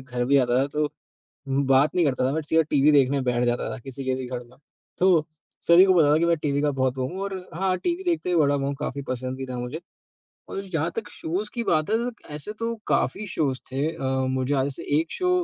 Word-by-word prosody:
घर 125 -1 -3
भी 135 +3 +2
जाता 125 -2 +4
था, 140 - 0
तो 150 +1 -1 0.6
म्म 135 +1 +1
बात 135 +2 +4
नहीं 180 - +3
करता 130 -2 +1
था - - -1
बट 160 +1 -2
सीधा 160 +2 +3
टीवी 145 +1 +4
देखने 140 -1 +4
बैठ 125 -1 +1
जाता 120 0 0
था, - - -7
किसी 135 +2 -7
के 130 0 0
भी 130 0 -4
घर 125 -1 -4
जाऊँ। 125 - -21 0.4
तो 175 -4 +4 0.4
सभी 170 +2 +8
को 190 -1 +4
पता 155 -5 +5
था - - +5
कि 165 - +2
मैं 170 0 +3
टीवी 145 -1 0
का 150 - +2
बहुत 130 -1 -1
वो 130 - 0
हूँ 185 +5 -6
और 200 -1 -3 0.2
हाँ, 185 +2 +1
टीवी 350 - -2
देखते 325 - -1
ही 175 - +2
बड़ा 145 -3 +4
हुआ 140 -1 -1
हूँ, 140 - -1
काफ़ी 140 -1 -3
पसंद 130 +1 -3
भी 135 0 -5
था 130 -1 -5
मुझे 125 +6 -5 0.7
और 195 - -4
जहाँ 160 +1 0
तक 225 -2 -4
शोज़ 185 +6 -3
की 235 - -2
बात 155 -6 +1
है 220 - +4
त - - -19
त - - -15
ऐसे 150 +7 -4
तो 230 0 -2
काफ़ी 215 - 0
शोज़ 145 -6 -1
थे 135 +3 0
अ, 150 - -5 0.2
मुझे 130 +1 0
याद 135 - +2
है, 140 - -1
जैसे 135 - -6 0.2
एक 160 0 -3
शो 365 -1 0
145 Hz, 265 wpm, -25 LUFS, 130-170 Hz, 0.7 s, सभी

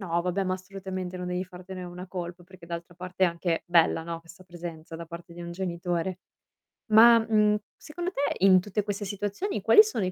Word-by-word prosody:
No, 170 -3 0
vabbè 180 +2 0
ma 185 - 0
assolutamente 185 -1 -6
non 180 0 -5
devi 180 +1 -1
fartene 185 +1 -9
una 180 +1 -8
colpa, 175 -1 -6
perché 185 -1 -15
d'altra 170 +1 -6
parte 180 +1 -1
è - - +6
anche 170 -1 -1
bella, 165 -1 +3
no, 165 0 -5
questa 170 +2 -15
presenza 170 -2 -8
da 165 0 -7
parte 170 0 -10
di 175 - -8
un 170 - -6
genitore. 175 0 -2 0.7
Ma, 230 +2 +9
mhmm, 215 -2 +3 0.2
secondo 350 +4 -5
te 285 -6 -1
in 185 -1 +7
tutte 205 +3 -2
queste 205 0 -3
situazioni 205 - -3
quali 425 - +8
sono 420 - -2
i 185 - -2
185 Hz, 200 wpm, -27 LUFS, 170-195 Hz, 0.7 s, Ma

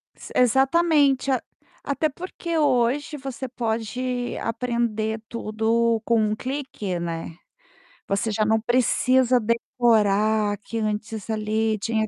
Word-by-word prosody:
S - - -12
exatamente, 275 +2 +3
a 255 - +1 0.4
até 295 +2 0
porque 340 +1 -5
hoje 285 +1 +1
você 265 -2 -6
pode 245 +1 -3
aprender 230 -2 -1
tudo 230 0 0
com 230 -1 +2
um 215 0 +1
clique, 255 -8 -4
né. 165 -1 -5 0.7
Você 200 +3 0
já 215 +1 +1
não 220 +1 +2
precisa 250 +2 +3
decorar 215 -2 +2
que 225 +3 -5
antes 215 0 -3
ali, 220 0 0
tinha 220 +1 -1
230 Hz, 115 wpm, -24 LUFS, 215-255 Hz, 0.7 s, exatamente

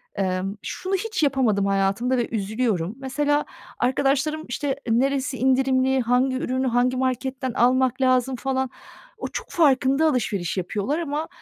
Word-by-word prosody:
emm, 190 +1 -1
şunu 380 +1 -3
hiç 425 -4 -2
yapamadım 245 -8 +2
hayatımda 195 +6 +1
ve 240 - 0
üzülüyorum. 215 -3 -1
Mesela 290 +2 0 0.3
arkadaşlarım, 280 +4 +1
işte, 275 +2 -2
neresi 265 +2 +1
indirimli, 260 0 +2
hangi 250 +2 +2
ürünü 260 0 -1
hangi 250 +1 +1
marketten 260 0 -2
almak 255 +1 +2
lazım 255 0 +2
falan, 265 0 -1 0.5
o - - -4
çok - - -6
farkında 280 -1 +3
alışveriş 205 - -1
yapıyorlar 205 - -2
ama, 305 -1 -3
260 Hz, 130 wpm, -23 LUFS, 235-270 Hz, 0.5 s, farkında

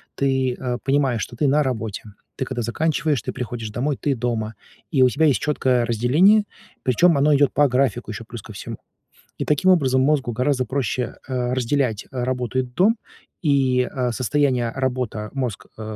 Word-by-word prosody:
ты, 130 -2 +1
э, 125 -2 -2
понимаешь, 135 -5 +1
что 120 - -8
ты 140 +5 +1
на 150 +2 +3
работе. 115 -6 -3 0.3
Ты 130 - -2
когда 125 -2 -4
заканчиваешь, 155 +3 0
ты - - -5
приходишь 115 -3 -5
домой, 135 +5 -1
ты 140 -2 0
дома. 115 -2 -2 0.4
И 135 -5 +2
у 125 - +6
тебя 160 +5 +2
есть 135 -9 +3
чёткое 130 -5 +1
разделение, 150 - +4 0.4
причём 155 +5 +4
оно 145 +2 +4
идёт 140 0 +3
по 145 -1 +4
графику 125 -3 0
ещё 115 +2 -7
плюс 115 -1 -8
ко 110 - -11
всему. - - -7 0.6
И - - -3
таким 150 +6 +3
образом 130 -7 +3
мозгу 135 -3 +1
гораздо 130 +1 0
проще, 125 -1 -2
а, 125 -1 -1
разделять, 125 -3 0
а, 125 -2 -2
работу 125 0 -1
и - - +4
дом. 185 - +2 0.5
И, 135 -3 +3
а, 125 -1 -2
состояние 130 -1 +1
"работа" 125 -5 -2
мозг, 125 -7 -3
э, 110 - -8
130 Hz, 180 wpm, -22 LUFS, 120-140 Hz, 0.6 s, у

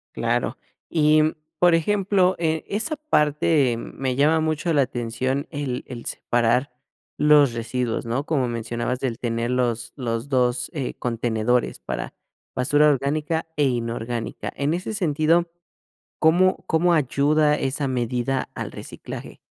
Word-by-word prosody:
Claro. - - -1 0.3
Y, 155 -1 +4
mm, 155 +1 +2 0.3
por 175 -1 +5
ejemplo, 190 +1 +2
eh, 160 -1 0
esa 240 +10 -1
parte 150 - +2
me 130 +1 -4
llama 155 +3 +3
mucho 155 +2 0
la 145 - +4
atención, 130 +4 -2
el 140 -4 -3
el 120 -2 -8
separar 120 +3 0 0.5
los 145 -3 +5
residuos, 115 +1 -2
¿no?, 120 +5 -1
como 135 -6 0
mencionabas, 120 +2 -3
el 120 -2 -2
tener 115 0 -1
los 120 -2 -1
los 115 +1 -3
2, 125 -2 +1
eh, 140 -5 -3
contenedores 120 0 0
para - - -5 0.4
basura 145 +4 +4
orgánica 150 +4 0
e 145 - +3
inorgánica. 115 -2 -3
En 145 +3 0
ese 185 +5 -3
sentido, 165 -2 +2 0.7
¿cómo 175 +4 +3
cómo 170 +2 +3
ayuda 150 +1 +3
esa 140 0 -2
medida 125 +1 -1
al - - -5
reciclaje? - - -9
140 Hz, 130 wpm, -23 LUFS, 120-155 Hz, 0.7 s, por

